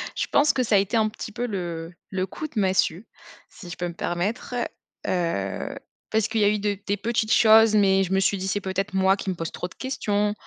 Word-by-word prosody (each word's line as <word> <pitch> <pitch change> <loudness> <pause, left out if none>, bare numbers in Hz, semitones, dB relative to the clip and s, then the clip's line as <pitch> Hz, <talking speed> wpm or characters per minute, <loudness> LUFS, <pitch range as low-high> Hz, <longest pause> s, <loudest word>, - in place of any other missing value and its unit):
Je - - 0
pense 290 +1 +4
que 255 - +1
ça 220 -3 +2
a - - +7
été 195 +3 +1
un 220 -1 +3
petit 215 0 -8
peu 245 +3 -2
le 170 -5 -4 0.2
le 185 -1 -1
coup 310 - -6
de 270 - -13
massue, 190 0 +1 0.4
si 180 -6 -12
je - - -6
peux 175 - -3
me 170 - -7
permettre, 195 +9 -3 0.5
heu, 165 - -2 0.4
parce 220 -1 +2
qu'il 220 -1 0
y - - +5
a 205 - +5
eu 210 - 0
de 205 -1 -1
des 205 - +1
petites 220 +1 -1
choses, 220 -1 +6
mais 195 -2 +4
je 190 0 -2
me 190 - +3
suis 195 +1 +2
dit 190 - -4
c'est 205 +2 -1
peut-être 195 +1 -3
moi 190 +1 +3
qui 195 - -4
me 185 - -1
pose 165 -1 -4
trop 180 - -4
de - - -17
questions, 210 -6 -1
200 Hz, 245 wpm, -24 LUFS, 185-220 Hz, 0.5 s, a